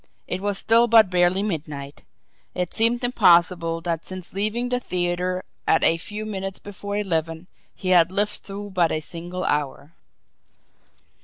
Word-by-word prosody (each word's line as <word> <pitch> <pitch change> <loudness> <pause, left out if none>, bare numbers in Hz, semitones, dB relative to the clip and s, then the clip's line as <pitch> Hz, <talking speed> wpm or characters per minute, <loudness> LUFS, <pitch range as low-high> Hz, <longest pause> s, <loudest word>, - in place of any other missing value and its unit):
It 180 - -3
was 205 -1 -1
still 230 +3 +4
but 220 -4 +6
barely 180 +2 +3
midnight! 150 -7 -5 0.5
It 180 -1 -2
seemed 235 +2 +2
impossible 170 -7 +3
that 165 -1 -3
since 185 -2 -8
leaving 215 +5 -1
the 250 0 0
theatre 180 -2 -2 0.2
at 160 - +3
a 165 - +4
few 210 +5 -6
minutes 195 -2 -5
before 205 0 -6
eleven, 165 -4 -2 0.3
he 185 - -4
had 175 -1 +5
lived 210 +2 0
through 200 +1 -8
but 175 -3 +2
a 155 - 0
single 175 +3 -6
hour! 145 -1 -2
185 Hz, 150 wpm, -23 LUFS, 165-205 Hz, 0.5 s, but